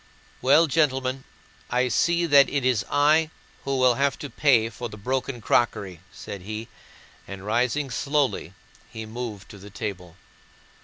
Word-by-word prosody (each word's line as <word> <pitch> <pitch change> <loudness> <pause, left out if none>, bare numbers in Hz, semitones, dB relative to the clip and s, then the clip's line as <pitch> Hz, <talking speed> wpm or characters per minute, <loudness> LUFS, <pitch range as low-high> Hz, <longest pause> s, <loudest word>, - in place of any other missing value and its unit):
"Well, 140 +6 +5
gentlemen, 135 -4 0 0.4
I 125 +1 +1
see 170 +6 +2
that 140 -4 +6
it 140 -3 -1
is 125 -7 +2
I 155 +2 +3 0.4
who 135 -1 -1
will 130 -1 +4
have 140 +3 0
to 145 - -8
pay 125 -7 +3
for 120 +2 -6
the 105 - -10
broken 130 +3 -3
crockery," 100 -6 0
said 100 - -8
he, 110 +4 -6 0.6
and 100 0 -8
rising 125 +5 0
slowly 140 +1 -1 0.4
he 110 0 -7
moved 110 -2 -7
to 100 - -12
the 100 +2 -12
table. 95 -4 -6
125 Hz, 150 wpm, -25 LUFS, 110-140 Hz, 0.6 s, that